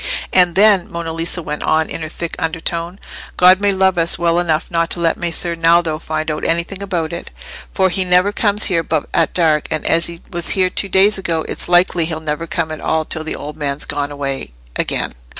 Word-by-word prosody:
"And 180 -2 +4
then," 200 -2 +4
Monna 170 -1 -4
Lisa 165 +1 -2
went 150 -1 -5
on, 160 0 +1
in - - -6
her 155 - -5
thick 170 0 -5
undertone, 165 +2 -3 0.4
"God 185 +2 +6
may 205 0 +3
love 190 -2 +2
us 165 0 +2
well 170 0 +2
enough 165 -2 -1
not 165 -1 +1
to - - -4
let 165 -1 +2
Messer 170 0 -1
Naldo 165 -1 +2
find 155 -1 -3
out 150 - -4
anything 170 +4 -1
about 175 -5 -2
it. 170 - -6 0.4
For 190 0 +2
he 185 +2 +2
never 180 +2 +3
comes 205 0 +1
here 170 -4 +2
but 155 - -1
at - - +1
dark; 155 -4 +2
and 155 -1 -3
as 165 +1 +2
he 170 0 -8
was 170 -1 0
here 185 -1 +2
two 195 - -1
days 195 +2 +4
ago, 165 -4 -2
it's - - -2
likely 175 -1 +3
he'll 160 -1 -4
never 155 +1 -4
come 165 -1 -2
at 155 - -6
all 160 0 0
till 160 - -4
the 160 - -4
old 150 0 -7
man's 145 -1 -2
gone 145 0 -3
away 135 - -4 0.2
again." - - -1
170 Hz, 220 wpm, -17 LUFS, 160-180 Hz, 0.4 s, God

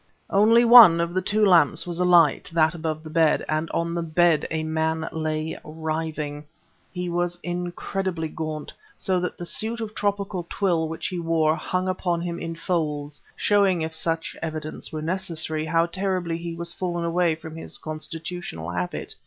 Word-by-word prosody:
Only 225 +4 +5
one 230 -8 +9
of 170 0 -1
the 185 - +1
two 210 +3 +2
lamps 170 -7 +4
was 175 -1 -5
alight 175 -4 +4
that 160 0 +3
above 160 -2 -4
the 155 - -8
bed; 160 -1 +3
and 155 +1 -1
on 170 0 -1
the 170 - -1
bed 165 0 +2
a 160 0 -2
man 160 0 -1
lay 155 0 -3
writhing. 155 -1 -4 0.5
He 180 -1 -4
was 175 0 -1
incredibly 175 0 -3
gaunt, 155 -1 -5 0.2
so 185 -1 0
that 180 - -3
the 175 - -6
suit 225 +6 0
of 220 -2 -5
tropical 200 -4 -2
twill 170 -5 0
which 160 +1 -6
he 180 - -4
wore 165 -2 +2
hung 185 +2 -2
upon 180 -2 -1
him 170 0 -4
in 165 0 -5
folds, 150 -4 -2
showing 195 -5 +2
if 160 0 -4
such 165 0 -1
evidence 155 -1 -5
were 155 -1 -5
necessary, 165 -3 -1
how 165 +1 +3
terribly 185 -2 -2
he 170 0 -5
was 170 0 -2
fallen 175 -2 -3
away 170 -1 +2
from 160 0 -10
his 165 - -2
constitutional 155 - -6
habit. 90 0 -4
165 Hz, 170 wpm, -24 LUFS, 160-180 Hz, 0.5 s, one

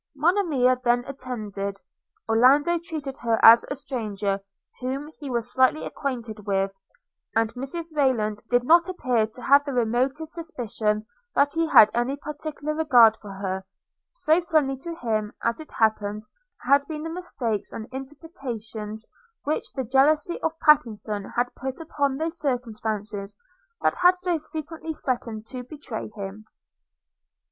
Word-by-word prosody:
Monimia 290 -6 +2
then 245 0 +3
attended. 210 -7 -5 0.5
Orlando 275 +9 +4
treated 305 -5 -6
her 230 -1 +1
as 230 +1 +10
a 285 - -2
stranger, 215 -8 -2 0.4
whom 270 +4 -4
he 285 -3 -6
was 240 -1 -2
slightly 260 +4 +3
acquainted 230 -7 -5
with; 195 0 +1 0.6
and 225 0 +2
Mrs 310 +6 -5
Rayland 220 -7 +1
did 245 0 +3
not 335 +6 +5
appear 250 -11 +1
to 225 +3 -13
have 280 +1 +6
the 280 -3 -4
remotest 260 +7 0
suspicion 225 - -2 0.3
that 285 0 +3
he 330 0 +1
had 215 -9 +8
any 240 +4 0
particular 300 +1 -5
regard 250 -8 +6
for 210 -2 -12
her: 190 -1 -4 0.5
so 345 -9 +2
friendly 310 -5 +1
to 335 +5 -6
him, 215 -6 -2
as 230 +4 0
it 310 - -10
happened, 215 -1 0 0.4
had 280 +2 +5
been 305 -1 -5
the 325 - -4
mistakes 250 - -3
and 220 - -7
interpretations 245 - -7 0.4
which 300 +2 -2
the 265 - -2
jealousy 295 +7 +2
of 325 0 -1
Pattenson 215 -8 +2
had 245 +1 0
put 265 +2 -5
upon 285 -4 -1
those 325 +2 -3
circumstances 215 -6 -3 0.5
that - - +3
had 360 0 +5
so 360 -2 0
frequently 315 +1 -6
threatened 230 -5 -3
to 255 +2 -6
betray 255 -5 -6
him. 200 +1 -7
255 Hz, 140 wpm, -25 LUFS, 220-305 Hz, 0.6 s, as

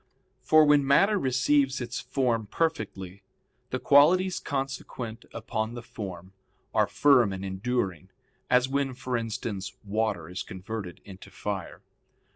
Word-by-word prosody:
For 155 0 +5
when 145 -1 +5
matter 195 +10 +4
receives 135 0 +2
its 120 0 -4
form 125 -4 -1
perfectly, 100 - -3 0.5
the - - -1
qualities 175 +6 +4
consequent 130 -4 -5
upon 110 0 -3
the 120 - -7
form 95 -5 -8 0.4
are - - +3
firm 130 -8 +4
and 95 0 -5
enduring; 95 -3 -2 0.4
as 125 +1 +4
when, 135 -1 -1
for 125 0 -3
instance, 110 -4 -4
water 105 -5 -1
is 90 +2 -5
converted 95 -1 -7
into 95 0 -12
fire. 100 -1 -5
115 Hz, 125 wpm, -27 LUFS, 100-135 Hz, 0.5 s, For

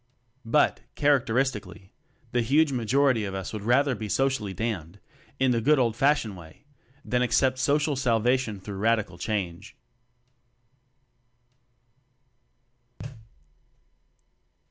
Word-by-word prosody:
But, 145 +6 +2 0.2
characteristically, 120 -8 0 0.4
the 120 - +1
huge 145 +6 +2
majority 125 0 +1
of 95 -1 -4
us 95 +2 -5
would 105 - -5
rather 130 +5 +2
be 110 -3 -6
socially 130 -5 0
damned 95 -3 -4 0.4
in 130 -1 +3
the 115 -1 +1
good 150 +6 +4
old 120 -4 +1
fashioned 135 -5 +1
way, 85 - -15 0.4
than 125 0 0
accept 130 +1 +2
social 145 +2 +1
salvation 120 -3 0
through 95 +1 -8
radical 105 -4 0
change. 95 -6 -4
120 Hz, 100 wpm, -26 LUFS, 105-135 Hz, 0.4 s, good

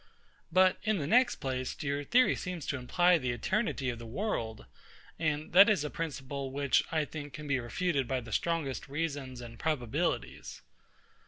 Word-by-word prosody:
But, 185 +2 +5
in 215 -2 +1
the 150 - -2
next 240 - +4
place, 130 -1 -3
your 140 0 -1
theory 250 - +4
seems 180 -4 -5
to - - -1
imply 175 +7 +3
the 130 -3 -2
eternity 135 - -1
of 120 - -8
the 115 - -8
world; 115 - -3 0.5
and 155 -1 -1
that 195 +4 +9
is 195 -9 +2
a 150 - -4
principle, 140 -4 -4
which, 140 -2 +2
I 155 -2 +1
think, 145 -1 -8
can 150 +3 -7
be 135 -2 +1
refuted 135 +2 -1
by 130 0 -1
the 115 -1 -10
strongest 160 -1 -1
reasons 140 -4 -3
and 115 -1 -10
probabilities. 120 - -2
145 Hz, 170 wpm, -31 LUFS, 130-170 Hz, 0.5 s, that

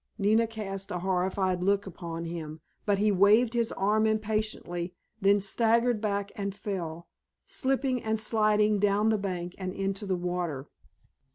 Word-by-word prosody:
Nina 220 +2 +3
cast 195 -3 -5
a 180 - -2
horrified 185 0 0
look 200 +2 +2
upon 170 -2 -6
him, 160 -2 -6 0.3
but 205 -1 +3
he 210 +1 +3
waved 210 +5 +5
his 235 -1 +1
arm 215 +3 +2
impatiently, 215 -5 -2 0.3
then 200 +1 +5
staggered 230 +3 +2
back 200 -1 -1
and 200 -1 -3
fell, 170 -5 -5 0.4
slipping 265 -2 0
and 220 0 -1
sliding 215 -1 +2
down 205 +2 +3
the 220 -1 +2
bank 180 -3 -4
and 185 -1 -3
into 195 +1 -2
the 185 -1 0
water. 175 -6 -3
200 Hz, 150 wpm, -28 LUFS, 180-215 Hz, 0.4 s, waved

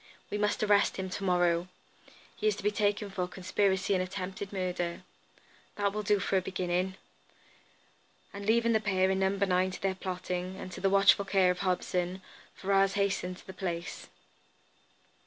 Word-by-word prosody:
We 205 - -1
must 210 +1 +1
arrest 205 -1 +3
him 190 -1 -4
to 200 - -4
morrow. 175 -2 +2 0.7
He - - -1
is 210 - +3
to 200 - -9
be 210 - +2
taken 205 -1 0
for 180 -2 -2
conspiracy 190 +1 0
and 185 - +2
attempted 190 +1 -5
murder. 180 -3 -2 0.7
That 200 -1 0
will 210 - -2
do 210 0 +2
for 195 0 +1
a - - +2
beginning." 185 0 -1 1.4
And 200 0 -7
leaving 230 +1 +3
the 220 - +4
pair 190 -3 +2
in 190 - 0
No. 190 0 +3
9 190 -2 +1
to 185 - -7
their 195 -1 0
plotting, 185 -1 -4
and 185 - -8
to - - -8
the 195 - +3
watchful 200 +1 +5
care 190 -2 +3
of 180 - -4
Hobson, 180 0 -1 0.3
Ferrars 195 0 +2
hastened 195 -2 -1
from - - -16
the 190 - -9
place. 175 -3 -4
190 Hz, 175 wpm, -30 LUFS, 185-200 Hz, 1.4 s, watchful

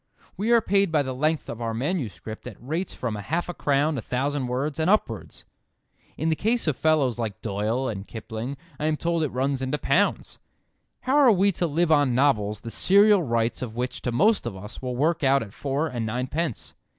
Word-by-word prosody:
We 205 +5 -2
are 235 -1 +6
paid 200 -3 +2
by 150 -2 +3
the 130 -1 -4
length 155 +4 0
of 115 - -6
our 115 -1 -2
manuscript 115 - -4
at - - -9
rates 160 +9 -3
from 115 -4 -3
half 155 +12 -2
a - - -3
crown 145 -1 +1
a - - -5
thousand 135 +3 -1
words, 135 +5 -2
and 160 +3 +2
upwards. 115 - -1 0.7
In 160 +3 0
the 160 - +2
case 230 +7 0
of 155 -4 +1
fellows 140 -5 +2
like 110 -4 -3
Doyle 110 +5 -1
and 100 -4 -5
Kipling 115 +4 -6 0.2
I 150 - 0
am 155 -1 +1
told 170 +1 0
it 155 - 0
runs 135 +1 -1
into 130 +3 -1
pounds. 170 +8 0 0.6
How 265 +3 +1
are 275 -5 +7
we 200 0 +3
to 175 -1 -1
live 165 +2 +1
on 145 -5 +4
novels 105 -6 +2
the 115 - -7
serial 200 - +5
rights 115 -5 0
of 115 -3 -5
which 125 +1 -3
to 125 - -2
most 205 - +3
of 110 - -5
us 105 +4 -9
will 125 -1 -3
work 155 +5 +1
out 135 -1 +4
at 100 -3 -12
four 140 +5 -1
and 120 -6 -4
nine 120 +3 -2
pence. 155 -2 -3
140 Hz, 210 wpm, -25 LUFS, 120-165 Hz, 0.7 s, are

